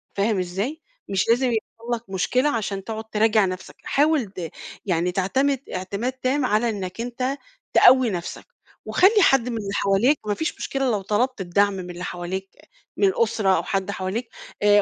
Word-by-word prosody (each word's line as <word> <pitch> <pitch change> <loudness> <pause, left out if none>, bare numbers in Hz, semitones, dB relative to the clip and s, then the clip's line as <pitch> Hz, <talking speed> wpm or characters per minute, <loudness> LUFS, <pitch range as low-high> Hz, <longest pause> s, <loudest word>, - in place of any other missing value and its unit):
فاهم 200 0 +1
إزاي؟ 200 - -3 0.3
مش 195 +2 0
لازِم 245 +3 +4
يحصل 230 +1 -3
لك 230 -3 -11
مشكلة 250 +9 +1
عشان 205 -6 -2
تقعد 220 +1 -5
تراجع 215 -1 +3
نفسَك. 185 0 -6
حاول 295 -2 +2
ت 185 -4 -7 0.4
يعني 180 -2 +1
تعتمد 260 +10 +1 0.2
اعتماد 200 +7 -3
تام 260 +2 0
على 225 0 +2
إنَّك 195 -1 -4
أنتَ 250 +3 -2 0.4
تقوِّي 255 -1 +7
نفسَك. 175 -4 -5 0.4
وخلِّي 410 +3 +4
حد 265 -8 +4
من 235 - -3
اللي 200 -2 -4
حوالِيك، 205 +10 +3
مفيش 210 +10 -2
مشكلة 270 -2 -1
لو 210 -3 0
طلَبت 215 +4 0
الدعم 200 +3 +2
من 185 -2 -6
اللي 175 +1 -7
حوالِيك، 185 +2 -4 0.5
من 400 - +4
الأسرة 230 - +1
أو - - -1
حد 195 0 -1
حواليك. 200 +5 -3 0.3
آآ، 205 0 +6
215 Hz, 165 wpm, -23 LUFS, 190-255 Hz, 0.5 s, تقوِّي